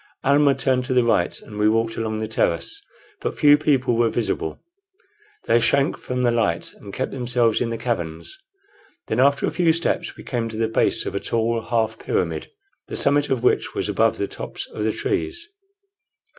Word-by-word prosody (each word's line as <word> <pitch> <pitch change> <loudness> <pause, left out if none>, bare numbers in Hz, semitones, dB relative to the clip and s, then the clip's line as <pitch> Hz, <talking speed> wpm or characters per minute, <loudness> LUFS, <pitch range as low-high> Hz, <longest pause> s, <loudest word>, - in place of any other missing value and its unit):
Almah 140 0 +4
turned 130 -2 +1
to 130 -1 -1
the 125 - +5
right, 105 -7 +1
and 105 -1 -9
we 105 0 +4
walked 115 +1 +1
along 110 -1 -2
the 110 0 -3
terrace. 85 -6 -1 0.4
But - - -4
few 145 -1 +7
people 135 -5 +1
were 115 0 +3
visible. 110 -8 -2 0.9
They 120 - +4
shrank 140 +5 +2
from 125 0 -3
the 120 - +3
light, 105 -8 0
and 100 - -11
kept 130 - -3
themselves 120 -3 +1
in 120 - 0
the 115 - -3
caverns. 90 - -3 0.7
Then 110 - 0
after 140 +2 +4
a - - -1
few 170 -2 +3
steps 165 +1 -1
we - - -10
came 115 -3 -2
to 110 - -6
the 115 0 +1
base 110 - +1
of - - -4
a 100 - -1
tall 115 +1 0
half 110 -1 -1
pyramid, - - -2 0.4
the - - -4
summit 145 +1 +2
of 130 -3 0
which - - +1
was - - -1
above - - +2
the - - -1
tops - - -6
of 105 - -3
the 110 - +1
trees. 345 - -2
120 Hz, 195 wpm, -22 LUFS, 110-135 Hz, 0.9 s, few